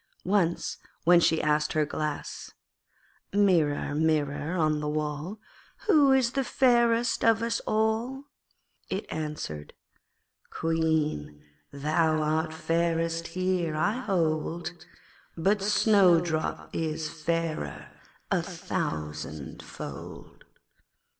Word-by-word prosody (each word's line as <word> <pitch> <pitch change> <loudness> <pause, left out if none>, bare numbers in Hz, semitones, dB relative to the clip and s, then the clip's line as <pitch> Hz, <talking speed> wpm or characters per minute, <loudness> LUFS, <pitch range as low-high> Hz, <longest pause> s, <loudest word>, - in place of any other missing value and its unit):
Once, 185 -3 +1 0.2
when 175 +1 +7
she 160 -1 +3
asked 150 0 +1
her 155 -1 +2
Glass, 150 0 -4 0.8
'Mirror, 170 -9 +2
Mirror 155 +1 0
on 155 -2 +2
the 150 0 -2
wall, 150 +6 -3 0.5
Who 300 -9 +5
is 260 -3 +3
fairest 240 -3 +2
of 225 0 +4
us 230 0 0
all?' 220 +5 0 0.7
it 195 +2 -2
answered 150 - -5 0.8
'Queen, 160 - -1 0.3
thou 155 +3 +1
art 155 +1 0
fairest 165 0 0
here, 185 -3 -1
I 205 +10 +1
hold, 170 -5 -1 0.6
But 195 +5 +2
Snowdrop 180 -6 +3
is 160 -1 -2
fairer 160 - -3 0.4
a - - +3
thousandfold.' 75 -1 -6
165 Hz, 90 wpm, -28 LUFS, 155-200 Hz, 0.8 s, when